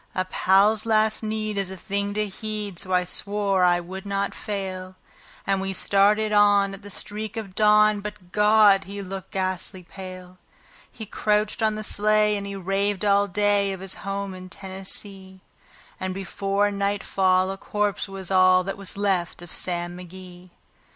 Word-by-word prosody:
A 185 Hz, -, 0 dB
pal's 205 Hz, +4 st, +3 dB
last 215 Hz, -1 st, +2 dB
need 215 Hz, -1 st, -2 dB
is 195 Hz, -2 st, -2 dB
a 190 Hz, -, -7 dB
thing 200 Hz, +2 st, -3 dB
to 215 Hz, 0 st, +1 dB
heed, 210 Hz, -2 st, -6 dB
so 185 Hz, -, -6 dB
I 180 Hz, 0 st, +3 dB
swore 200 Hz, +1 st, 0 dB
I 175 Hz, -1 st, +4 dB
would 185 Hz, +2 st, -8 dB
not 200 Hz, 0 st, -2 dB
fail; 190 Hz, -2 st, -5 dB, 0.5 s
And 195 Hz, -1 st, +1 dB
we 195 Hz, 0 st, -3 dB
started 210 Hz, +3 st, +3 dB
on 205 Hz, -1 st, +4 dB
at 195 Hz, -, -9 dB
the 205 Hz, -, -10 dB
streak 210 Hz, +2 st, -4 dB
of 205 Hz, -4 st, -5 dB
dawn; 210 Hz, 0 st, +4 dB
but 205 Hz, -3 st, -9 dB
God! 210 Hz, -2 st, +5 dB
he 200 Hz, +1 st, -6 dB
looked 190 Hz, 0 st, -7 dB
ghastly 185 Hz, 0 st, -3 dB
pale. 185 Hz, 0 st, -10 dB, 0.5 s
He 220 Hz, -, -8 dB
crouched 210 Hz, +1 st, 0 dB
on 215 Hz, -1 st, +2 dB
the 215 Hz, -, -5 dB
sleigh, 210 Hz, 0 st, +2 dB
and 200 Hz, -1 st, -4 dB
he 200 Hz, -, -5 dB
raved 195 Hz, +2 st, -1 dB
all 200 Hz, 0 st, +4 dB
day 205 Hz, 0 st, +1 dB
of 190 Hz, -, -7 dB
his 190 Hz, 0 st, -1 dB
home 200 Hz, 0 st, -4 dB
in 185 Hz, 0 st, -10 dB
Tennessee; 190 Hz, 0 st, -6 dB, 0.6 s
And 185 Hz, 0 st, -3 dB
before 195 Hz, +2 st, -1 dB
nightfall 195 Hz, -2 st, +1 dB
a 195 Hz, -, -6 dB
corpse 205 Hz, -1 st, -1 dB
was 195 Hz, -1 st, -6 dB
all 185 Hz, -1 st, +5 dB
that 195 Hz, +1 st, -4 dB
was 195 Hz, 0 st, -7 dB
left 185 Hz, -4 st, -1 dB
of 175 Hz, -, -11 dB
Sam 175 Hz, -1 st, -2 dB
McGee. 180 Hz, 0 st, -11 dB
195 Hz, 170 wpm, -24 LUFS, 185-210 Hz, 0.6 s, God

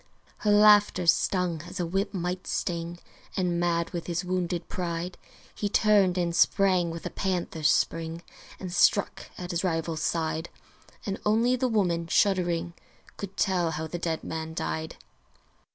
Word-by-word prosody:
Her 210 Hz, -, -1 dB
laughter 205 Hz, -3 st, +6 dB
stung 175 Hz, -1 st, +2 dB
as 190 Hz, -, -7 dB
a 175 Hz, -, 0 dB
whip 195 Hz, +4 st, -1 dB
might 180 Hz, -1 st, -3 dB
sting; 170 Hz, -1 st, -2 dB, 0.4 s
And 175 Hz, -2 st, 0 dB
mad 170 Hz, -1 st, 0 dB
with 170 Hz, -1 st, -5 dB
his 175 Hz, +1 st, -2 dB
wounded 180 Hz, -1 st, -2 dB
pride 175 Hz, 0 st, -4 dB, 0.4 s
He 205 Hz, -, -2 dB
turned 200 Hz, -4 st, +3 dB
and 170 Hz, -1 st, 0 dB
sprang 185 Hz, -2 st, +3 dB
with 165 Hz, 0 st, -7 dB
a -, -, -3 dB
panther's 175 Hz, -5 st, -1 dB
spring 165 Hz, +1 st, 0 dB, 0.4 s
And 185 Hz, -2 st, -6 dB
struck 200 Hz, +2 st, +2 dB
at 180 Hz, 0 st, -5 dB
his 170 Hz, +1 st, -1 dB
rival's 165 Hz, -3 st, -1 dB
side: 160 Hz, 0 st, -1 dB, 0.6 s
And 195 Hz, -1 st, -3 dB
only 230 Hz, +4 st, +3 dB
the 255 Hz, +1 st, 0 dB
woman, 175 Hz, -7 st, 0 dB
shuddering, 175 Hz, -2 st, +1 dB, 0.4 s
Could 195 Hz, -1 st, -8 dB
tell 180 Hz, -4 st, +1 dB
how 160 Hz, 0 st, -3 dB
the 170 Hz, +2 st, -5 dB
dead 165 Hz, -2 st, -2 dB
man 160 Hz, 0 st, -5 dB
died! 160 Hz, -1 st, -3 dB
175 Hz, 150 wpm, -27 LUFS, 170-195 Hz, 0.6 s, laughter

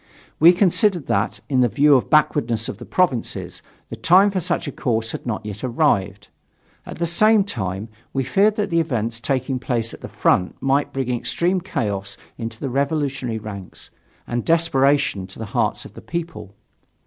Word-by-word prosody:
We 165 Hz, +3 st, +8 dB
considered 180 Hz, -, +2 dB
that, -, -, -1 dB
in 130 Hz, -3 st, +2 dB
view 145 Hz, +7 st, +4 dB
of 130 Hz, -, +4 dB
the -, -, -24 dB
backwardness 120 Hz, -7 st, +2 dB
of 130 Hz, -, -6 dB
the -, -, -10 dB
provinces, 170 Hz, -11 st, -1 dB, 0.3 s
the -, -, -5 dB
time 190 Hz, +4 st, +4 dB
for 190 Hz, -, -1 dB
such 165 Hz, -, -1 dB
a -, -, -3 dB
course 115 Hz, -3 st, -1 dB
had -, -, -7 dB
not 110 Hz, -2 st, -3 dB
yet 105 Hz, -1 st, -7 dB
arrived. 125 Hz, -, 0 dB, 0.6 s
At -, -, -8 dB
the 170 Hz, -, 0 dB
same 215 Hz, +5 st, +4 dB
time, 100 Hz, -, -4 dB, 0.2 s
we 135 Hz, -, -1 dB
feared 205 Hz, +8 st, +2 dB
that 205 Hz, -2 st, -2 dB
the 170 Hz, -, +3 dB
events 115 Hz, -8 st, -2 dB
taking 130 Hz, +1 st, -1 dB
place 115 Hz, -2 st, -1 dB
at -, -, -11 dB
the -, -, -8 dB
front 90 Hz, -, +1 dB
might 135 Hz, +2 st, +1 dB
bring 130 Hz, -2 st, -2 dB
extreme 175 Hz, +9 st, 0 dB
chaos 100 Hz, -7 st, -3 dB, 0.2 s
into 115 Hz, -1 st, -7 dB
the 135 Hz, -, -4 dB
revolutionary 135 Hz, -3 st, -1 dB
ranks, 100 Hz, -4 st, -9 dB, 0.3 s
and 120 Hz, -1 st, -3 dB
desperation 140 Hz, -, +2 dB
to 95 Hz, -, -13 dB
the 110 Hz, -, -5 dB
hearts -, -, 0 dB
of -, -, -12 dB
the -, -, -11 dB
people. 135 Hz, -, -6 dB
135 Hz, 180 wpm, -21 LUFS, 115-165 Hz, 0.6 s, We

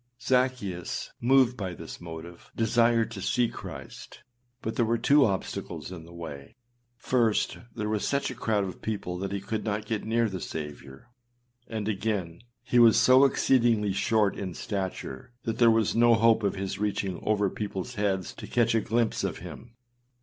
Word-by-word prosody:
Zaccheus, 125 Hz, -9 st, -1 dB
moved 130 Hz, 0 st, +4 dB
by 95 Hz, -6 st, -4 dB
this -, -, -9 dB
motive, 85 Hz, 0 st, -9 dB
desired 115 Hz, 0 st, +2 dB
to 100 Hz, -4 st, -7 dB
see 120 Hz, +5 st, +2 dB
Christ; -, -, -10 dB, 0.4 s
but 110 Hz, -, -3 dB
there 120 Hz, -, +2 dB
were 115 Hz, +1 st, +1 dB
two 140 Hz, +5 st, +5 dB
obstacles 95 Hz, -2 st, -3 dB
in 85 Hz, -3 st, -8 dB
the 85 Hz, -, -14 dB
way: 75 Hz, -5 st, -9 dB, 0.4 s
first, 120 Hz, -2 st, +1 dB, 0.2 s
there 110 Hz, -2 st, -2 dB
was 105 Hz, -1 st, -1 dB
such 140 Hz, -1 st, 0 dB
a -, -, -5 dB
crowd 110 Hz, -4 st, 0 dB
of 95 Hz, -1 st, -6 dB
people 95 Hz, -5 st, -3 dB
that 95 Hz, +1 st, -3 dB
he 100 Hz, -, -2 dB
could 105 Hz, +2 st, -4 dB
not 105 Hz, 0 st, -2 dB
get 110 Hz, -1 st, -2 dB
near 115 Hz, +1 st, +1 dB
the 95 Hz, -3 st, -5 dB
Saviour; 75 Hz, -, -8 dB, 0.6 s
and 110 Hz, -2 st, -4 dB
again, 100 Hz, -5 st, -2 dB, 0.2 s
he 120 Hz, -, +2 dB
was 115 Hz, -2 st, +7 dB
so 130 Hz, +2 st, +7 dB
exceedingly 115 Hz, -6 st, +3 dB
short 105 Hz, 0 st, +2 dB
in 95 Hz, -4 st, -5 dB
stature 95 Hz, -, -5 dB
that 115 Hz, -, -3 dB
there 120 Hz, -1 st, +7 dB
was 110 Hz, -2 st, +2 dB
no 120 Hz, 0 st, +6 dB
hope 115 Hz, 0 st, +4 dB
of 100 Hz, -2 st, 0 dB
his 95 Hz, 0 st, -4 dB
reaching 100 Hz, -3 st, -1 dB
over 105 Hz, -1 st, +2 dB
peopleâs 100 Hz, -3 st, -4 dB
heads 100 Hz, -3 st, -1 dB
to -, -, -9 dB
catch 120 Hz, -1 st, +2 dB
a 115 Hz, -, +3 dB
glimpse 115 Hz, +1 st, 0 dB
of -, -, -2 dB
him. 115 Hz, -1 st, -10 dB
110 Hz, 175 wpm, -28 LUFS, 95-115 Hz, 0.6 s, was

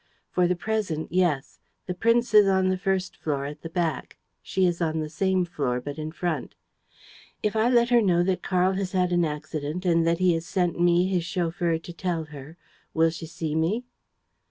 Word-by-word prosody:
"For 180 Hz, -1 st, +2 dB
the 180 Hz, -, +1 dB
present, 185 Hz, -5 st, -2 dB
yes. 175 Hz, -6 st, 0 dB, 0.3 s
The 180 Hz, -, -3 dB
prince 230 Hz, +5 st, +2 dB
is 210 Hz, -2 st, +7 dB
on 190 Hz, -1 st, +3 dB
the 185 Hz, -, +1 dB
first 190 Hz, 0 st, -1 dB
floor, 140 Hz, -3 st, -2 dB
at 150 Hz, +1 st, -7 dB
the 165 Hz, -, -7 dB
back; 165 Hz, -4 st, -2 dB, 0.2 s
she 190 Hz, -1 st, 0 dB
is 175 Hz, -1 st, 0 dB
on 160 Hz, -1 st, 0 dB
the 155 Hz, -1 st, -4 dB
same 190 Hz, +2 st, +1 dB
floor, 140 Hz, -8 st, -2 dB
but 145 Hz, +4 st, -7 dB
in 155 Hz, 0 st, -4 dB
front." 165 Hz, -4 st, -3 dB, 0.9 s
"If 210 Hz, 0 st, 0 dB
I 220 Hz, +2 st, +3 dB
let 240 Hz, -1 st, +4 dB
her 240 Hz, -1 st, +6 dB
know 175 Hz, -4 st, +3 dB
that 185 Hz, 0 st, 0 dB
Karl 185 Hz, 0 st, +2 dB
has 190 Hz, -1 st, -3 dB
had 180 Hz, -1 st, +1 dB
an 175 Hz, -1 st, +3 dB
accident 150 Hz, +3 st, -4 dB
and 165 Hz, -2 st, +3 dB
that 170 Hz, 0 st, +2 dB
he 185 Hz, -1 st, +3 dB
has 165 Hz, 0 st, -3 dB
sent 180 Hz, -4 st, 0 dB
me, 175 Hz, +1 st, +4 dB
his 185 Hz, -2 st, 0 dB
chauffeur, 170 Hz, -1 st, -1 dB
to 170 Hz, +2 st, -10 dB
tell 170 Hz, -2 st, -2 dB
her, 145 Hz, +4 st, -10 dB, 0.4 s
will 165 Hz, 0 st, +4 dB
she 165 Hz, 0 st, -7 dB
see 160 Hz, -1 st, -4 dB
me?" 170 Hz, +10 st, 0 dB
175 Hz, 205 wpm, -26 LUFS, 160-185 Hz, 0.9 s, is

